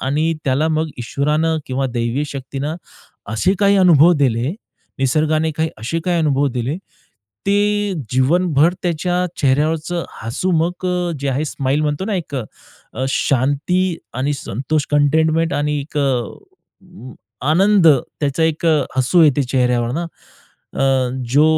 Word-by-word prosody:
आणि 155 +5 0
त्याला 140 +4 +1
मग 160 0 0
ईश्वरानं 150 +6 0
किंवा 130 +1 -1
दैवी 120 +5 -1
शक्तीनं 140 +3 -5 0.6
असे 185 - +1
काही 200 -1 +4
अनुभव 175 -3 +6
दिले, 130 - +1 0.4
निसर्गाने 155 +4 +1
काही 160 0 0
असे 140 +10 -3
काही 175 -2 +1
अनुभव 145 -2 +2
दिले, 130 +7 -2 0.7
ते 205 0 +1 0.2
जीवनभर 160 +4 +3
त्याच्या 180 +1 0
चेहऱ्यावरचं 155 +5 0 0.2
हसू 115 +12 -2
मग 175 +3 -2
अ, 180 -1 -1
जे 140 - -2
आहे 135 +4 0
स्माईल 140 0 -1
म्हणतो 150 +4 -1
ना 215 -1 -2
एक 160 -5 -4
अ, 125 +1 -8
शांती 145 +8 0 0.2
आणि 135 +4 -1
संतोष 140 +4 -2
कंटेनमेंट 160 +3 +2
आणि 150 0 0
एक 150 +2 -10
अ, 135 -4 +1 1.2
आनंद 190 +3 +4
त्याचा 145 +2 +1
एक 160 +1 -1 0.3
हसू 145 +7 +4
येते 145 -2 +4
चेहऱ्यावर 125 -2 0
ना, 170 +4 -2 0.7
अ, 135 -2 +1 0.2
जो 150 +2 +6
150 Hz, 130 wpm, -18 LUFS, 135-170 Hz, 1.2 s, अनुभव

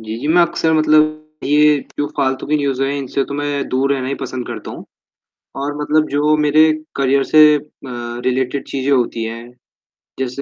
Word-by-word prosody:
जी, 110 0 -6
जी, 145 - -3
मैं 175 +2 +5
अक्सर 160 -1 0
मतलब 155 0 +3 0.3
ये 150 +1 +4 0.2
जो 145 - 0
फालतू 130 0 -1
के 150 +2 +1
न्यूज़ 135 -2 -1
हैं 135 - 0
इनसे 135 0 -2
तो 140 - -7
मैं 145 -1 -2
दूर 135 +2 +1
रहना 130 -2 -2
ही 140 - -2
पसंद 130 -2 -5
करता - - -7
हूँ। - - -9 0.7
और 145 +1 -3
मतलब 155 +1 +1
जो 150 +2 +2
मेरे 155 +1 +4 0.2
करियर 140 0 +2
से 155 - +4 0.4
म 120 -2 -6
रिलेटेड 130 +1 -1
चीजें 135 0 -2
होती 120 -3 0
हैं 115 +1 -7 0.7
जैसे 130 +1 -3
140 Hz, 185 wpm, -18 LUFS, 130-150 Hz, 0.7 s, मैं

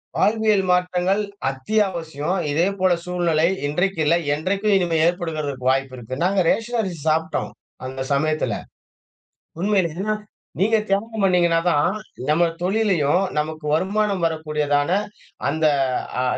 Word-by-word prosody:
வாழ்வியல் 215 -2 +2
மாற்றங்கள் 180 +2 +2 0.3
அத்தியாவசியம் 170 +1 -1
இதேபோல 185 +4 +1
சூழ்நிலை 170 -3 +1 0.2
இன்றைக்கும் 175 +3 0
இல்ல, 165 - +4 0.2
என்றைக்கும் 195 +7 0
இனிமே 175 -3 +1
ஏற்படுக்கிறதற்கு 155 -7 -2
வாய்ப்பு 135 0 -1
இருக்குனா. 130 +5 -5
நாங்க 190 +1 +2
ரேஷன் 235 +1 0
அரிசி 185 -5 -4
சாப்டோம் 160 +1 0 0.3
அந்த 130 +1 -4
சமயத்துல. 155 +2 0 1.1
உண்மையிலே 195 +1 0 0.4
நீங்க 220 +4 +3
தியாகம் 215 +2 -1
பண்ணீங்கன்னா 175 -3 +3
தான் 145 -2 +3 0.4
நம்ம 170 +3 +4 0.2
தொழிலயும் 185 -4 +2 0.2
நமக்கு 155 0 -4
வருமானம் 195 +2 0
வரக்கூடியதான 150 -2 0 0.6
அந்த 160 +2 0 0.6
அ - - +1
175 Hz, 110 wpm, -22 LUFS, 155-195 Hz, 1.1 s, இல்ல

